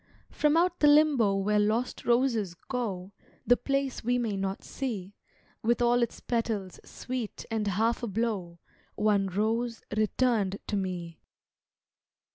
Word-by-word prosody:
From 300 +1 +2
out 350 +1 +2
the 295 - +5
limbo 290 -9 +5
where 205 +2 +1
lost 220 +4 0
roses 235 -7 +2
go 195 -4 -4 0.3
The 245 - +6
place 275 0 -2
we 245 +2 +1
may 230 -4 -1
not 195 0 -3
see, 205 -8 -5 0.5
With 235 +2 +1
all 240 0 +3
its 235 - -1
petals 220 -5 -2
sweet 250 -4 -6
and 220 -2 -1
half 225 +6 +1
ablow, 205 -6 -2 0.4
One 205 -2 +2
rose 225 +4 -1
returned 215 -2 +1
to - - -2
me. 180 -4 -4
225 Hz, 130 wpm, -29 LUFS, 195-245 Hz, 0.5 s, The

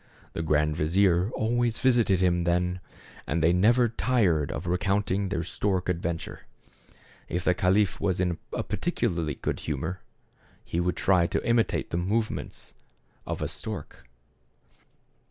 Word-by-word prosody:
The - - -3
grand 75 -1 +1
vizier 90 +4 +2
always 120 +1 +1
visited 115 -8 +3
him 90 -1 +3
then, 90 +1 0 0.5
and 85 - 0
they 85 +2 +5
never 120 +7 +4
tired 105 - +1
of 80 - -5
recounting 95 +2 0
their 85 -4 -1
stork 90 +1 -1
adventure. 85 -1 -3 0.8
If 90 +1 -2
the 90 - +3
caliph 95 +1 +2
was 95 -3 0
in 90 -2 0
a - - -2
particularly 80 -4 -1
good - - -3
humor, 80 +6 -4 0.6
he 85 - -2
would 90 -1 0
try 90 -3 +3
to - - -2
imitate 115 -1 +1
the - - -1
movements 105 +6 -2 0.5
of - - -3
a - - -1
stork. 65 - -8
90 Hz, 135 wpm, -27 LUFS, 85-105 Hz, 0.8 s, they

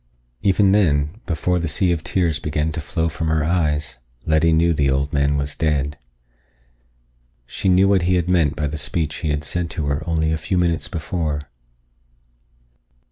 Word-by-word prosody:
Even 95 0 +3
then, 85 -1 +1
before 90 +1 0
the 85 - -2
sea 85 +5 +1
of 80 -2 -1
tears 85 -5 0
began 75 +1 -1
to 80 - -4
flow 80 +3 -1
from 80 0 -3
her 80 -1 +1
eyes, 75 -5 -1 0.3
Letty 80 +1 +3
knew 85 +1 +3
the 70 -3 +1
old 70 +2 0
man 70 0 +2
was 70 +1 -2
dead. 75 -3 0 1.5
She 95 - -2
knew 95 +1 +5
what 100 -2 +3
he 90 +2 +2
had 90 -1 0
meant 85 -5 +2
by 75 - -2
the 75 +1 -3
speech 75 +2 -1
he 80 - -3
had 75 0 -1
said 85 +3 -2
to 80 -4 -3
her 70 +2 -1
only 80 -1 +1
a 80 - 0
few 85 +4 -2
minutes 85 -2 +1
before. 75 -2 -3
80 Hz, 180 wpm, -21 LUFS, 75-85 Hz, 1.5 s, knew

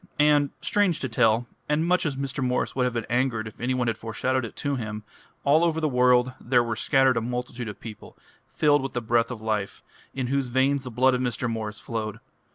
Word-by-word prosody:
And, 150 -1 +4
strange 200 -5 +1
to 130 - -1
tell, 115 0 +3 0.2
and 150 +2 +2
much 180 -1 +2
as 145 - -2
Mr. 135 0 -3
Morris 125 0 -1
would 130 -1 +2
have 125 - -1
been 115 - -2
angered 120 -3 0
if 110 - -12
any 130 +2 0
one 125 -1 0
had 115 -2 -1
foreshadowed 130 +3 -1
it 115 - -7
to 140 -1 -2
him, 110 -3 -5 0.4
all 150 +4 +4
over 165 -2 +1
the 155 - +1
world 125 -1 +3
there 120 -1 +3
were 115 -1 -2
scattered 135 +1 +3
a - - +1
multitude 125 0 -4
of 105 - -7
people, 110 -3 -10 0.3
filled 145 -2 +2
with 135 - -5
the 120 - 0
breath 115 0 +1
of 120 -3 -6
life, 110 -3 -2 0.3
in 130 -1 -1
whose 140 -2 +1
veins 130 +2 +1
the - - -4
blood 130 +2 +3
of 125 - 0
Mr. 125 -1 -1
Morris 110 -2 -4
flowed. 110 -2 -4
125 Hz, 225 wpm, -25 LUFS, 115-135 Hz, 0.4 s, And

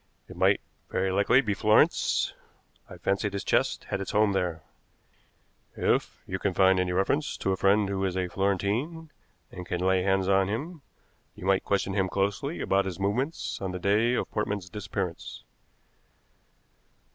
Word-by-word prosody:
It - - -11
might - - +3 0.3
very 95 0 0
likely 100 +7 +4
be 105 -6 -1
Florence. 105 +1 +3 0.6
I - - -10
fancy 100 +1 0
this 100 0 -4
chest - - +1
had 100 - -2
its 100 - -5
home 105 0 +3
there. 90 -4 -2 1.1
If - - 0
you - - -4
find 95 -1 +3
any 90 -1 0
reference 95 +11 0
to 95 - -1
a - - +2
friend 100 +2 +3
who 95 -1 -2
is 95 -1 -2
a 90 -1 0
Florentine, 105 - -1 0.4
and 90 - -7
can 90 0 -3
lay 95 +1 +2
hands 95 0 +1
on 95 -1 +3
him, 150 - -4 0.5
you - - -9
might 95 0 +2
question 100 -1 0
him 95 -1 +1
closely 100 - -1
about 100 +1 +2
his 95 -1 -5
movements 125 +11 -2
on 95 -1 -3
the - - -3
day 110 +6 +2
of - - -2
Portman's 100 -4 -3
disappearance." 95 -4 -5
100 Hz, 160 wpm, -27 LUFS, 95-105 Hz, 1.1 s, likely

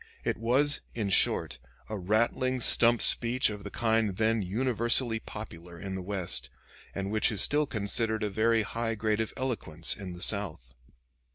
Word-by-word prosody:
It - - -2
was, 130 +6 +1
in 105 -4 -2
short, - - +1 0.3
a 110 - -5
rattling 115 +6 0
stump 120 0 +4
speech 120 0 +4
of 105 -1 -8
the - - -7
kind 110 -4 0
then 110 0 +1
universally 115 +3 +1
popular 85 -6 -10
in 95 -1 -6
the 95 - -5
West, 90 -8 -1 0.5
and 95 +1 -4
which 110 +1 +1
is 105 - -2
still 150 0 +3
considered 110 0 0
a 105 - -1
very 110 +2 +1
high 115 +3 -3
grade 110 0 -1
of 110 - -4
eloquence 85 -11 0
in 95 -4 -8
the 90 +1 -5
South. 80 - -1
110 Hz, 165 wpm, -28 LUFS, 100-115 Hz, 0.5 s, stump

